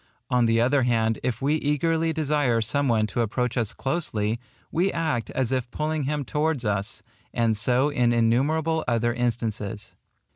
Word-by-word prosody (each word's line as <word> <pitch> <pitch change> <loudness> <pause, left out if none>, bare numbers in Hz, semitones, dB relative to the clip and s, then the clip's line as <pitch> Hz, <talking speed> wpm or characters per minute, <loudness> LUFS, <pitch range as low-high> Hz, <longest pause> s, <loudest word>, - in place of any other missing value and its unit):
On 125 -2 +3
the 115 0 +3
other 130 +4 +3
hand, 115 -3 +1
if 125 -1 -2
we 150 +3 +2
eagerly 160 +3 +1
desire 145 -6 +1
some 125 +6 0
one 110 -3 +2
to 110 +3 -2
approach 125 +2 -1
us 115 -4 0
closely, 115 -7 -1 0.3
we 185 +4 +1
act 155 -9 -1
as 130 -2 -1
if 130 -2 -1
pulling 155 +1 -2
him 145 0 -2
towards 150 -4 -1
us; 100 -1 -1 0.3
and 115 -2 +2
so 125 +7 +2
in 125 -5 +2
innumerable 145 +8 +2
other 120 0 +1
instances. 115 -4 -3
125 Hz, 160 wpm, -25 LUFS, 115-150 Hz, 0.3 s, On